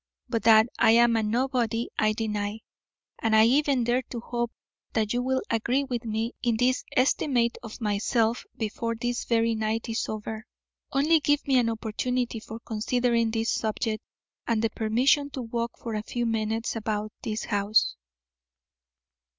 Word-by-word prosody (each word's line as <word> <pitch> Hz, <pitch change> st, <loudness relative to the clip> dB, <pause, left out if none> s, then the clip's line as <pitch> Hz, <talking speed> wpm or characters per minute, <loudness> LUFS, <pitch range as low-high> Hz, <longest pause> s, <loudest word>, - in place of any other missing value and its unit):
But 230 Hz, -2 st, -1 dB
that 220 Hz, -1 st, +7 dB
I 220 Hz, -, +6 dB
am 235 Hz, 0 st, +5 dB
a 225 Hz, -, +2 dB
nobody 235 Hz, 0 st, 0 dB
I 215 Hz, 0 st, +3 dB
deny, 210 Hz, -1 st, -3 dB, 0.6 s
and 225 Hz, -1 st, +2 dB
I 220 Hz, 0 st, +7 dB
even 275 Hz, +1 st, +3 dB
dare 240 Hz, +2 st, +2 dB
to 240 Hz, -, -5 dB
hope 240 Hz, 0 st, -3 dB, 0.4 s
that 215 Hz, -1 st, 0 dB
you 245 Hz, -, +1 dB
will 260 Hz, +1 st, 0 dB
agree 235 Hz, +4 st, +1 dB
with 245 Hz, -3 st, -4 dB
me 225 Hz, +2 st, -2 dB
in 235 Hz, -2 st, +1 dB
this 255 Hz, +2 st, +2 dB
estimate 250 Hz, -2 st, +2 dB
of 225 Hz, -2 st, -9 dB
myself 225 Hz, +2 st, +1 dB
before 230 Hz, +1 st, -2 dB
this 240 Hz, +1 st, -2 dB
very 230 Hz, -1 st, +2 dB
night 220 Hz, +1 st, -1 dB
is 225 Hz, -, -2 dB
over. 220 Hz, +2 st, -5 dB, 0.4 s
Only 305 Hz, +4 st, +4 dB
give 290 Hz, 0 st, +1 dB
me 265 Hz, -2 st, +4 dB
an 235 Hz, -2 st, +2 dB
opportunity 230 Hz, +2 st, -2 dB
for 220 Hz, +1 st, -9 dB
considering 235 Hz, +1 st, 0 dB
this 225 Hz, +1 st, 0 dB
subject, 220 Hz, 0 st, -1 dB, 0.5 s
and 230 Hz, -1 st, +1 dB
the 225 Hz, -, +1 dB
permission 255 Hz, +7 st, +2 dB
to 260 Hz, -, -4 dB
walk 235 Hz, 0 st, -3 dB
for 230 Hz, -, -6 dB
a 215 Hz, -, -1 dB
few 240 Hz, +2 st, -3 dB
minutes 225 Hz, 0 st, -1 dB
about 215 Hz, -1 st, -3 dB
this 215 Hz, 0 st, -3 dB
house." 205 Hz, -, +2 dB
230 Hz, 160 wpm, -27 LUFS, 220-245 Hz, 0.6 s, that